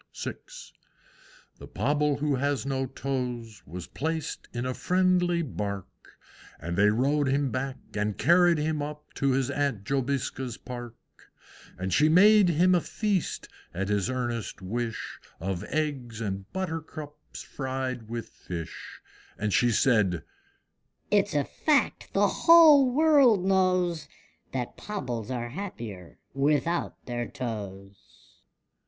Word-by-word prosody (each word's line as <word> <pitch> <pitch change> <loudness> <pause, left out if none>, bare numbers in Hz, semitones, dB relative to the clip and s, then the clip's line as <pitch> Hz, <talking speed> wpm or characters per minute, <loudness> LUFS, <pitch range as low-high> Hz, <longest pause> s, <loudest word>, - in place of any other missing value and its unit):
VI. - - -3 1.3
The - - -10
Pobble 150 0 +1
who 150 0 0
has 140 +1 0
no 135 -1 -1
toes 125 -5 -4
Was 85 +3 -7
placed 160 +2 -4
in 120 0 -3
a 130 - -1
friendly 180 +1 +2
Bark, 100 - -6 0.4
And 85 +3 -4
they 105 +3 +5
rowed 140 +6 +2
him 135 0 +1
back, 130 +2 -3 0.2
and 105 0 -1
carried 175 +2 +5
him 155 0 -1
up 150 +1 -7
To 140 - +1
his 130 -1 0
Aunt 140 -8 -1
Jobiska's 130 -1 -2
Park. 120 -2 -8 0.8
And 95 +1 -3
she 150 +8 +4
made 200 +3 +6
him 175 +3 +4
a 175 - +3
feast, 205 -2 -2 0.3
at 100 +3 -2
his 105 +2 +1
earnest 120 -5 -3
wish, 115 +5 -4 0.2
Of 95 +1 -3
eggs 135 -7 -2
and 100 -3 -4
buttercups 155 -4 -6
fried 130 -4 -4
with 115 0 -5
fish; 85 -3 -8 0.4
And 105 -2 -1
she 120 +7 +4
said, 105 -8 +2 0.9
"It's 205 -4 +2
a 145 - +3
fact 300 -3 0
the - - +4
whole 310 -6 +7
world 270 - +5
knows, 185 -3 +2 0.4
That 125 -2 -4
Pobbles 125 - -4
are 120 -2 -3
happier 115 - -7 0.2
without 150 +5 0
their 120 -1 -3
toes." 100 -5 -8
135 Hz, 125 wpm, -27 LUFS, 115-165 Hz, 1.3 s, whole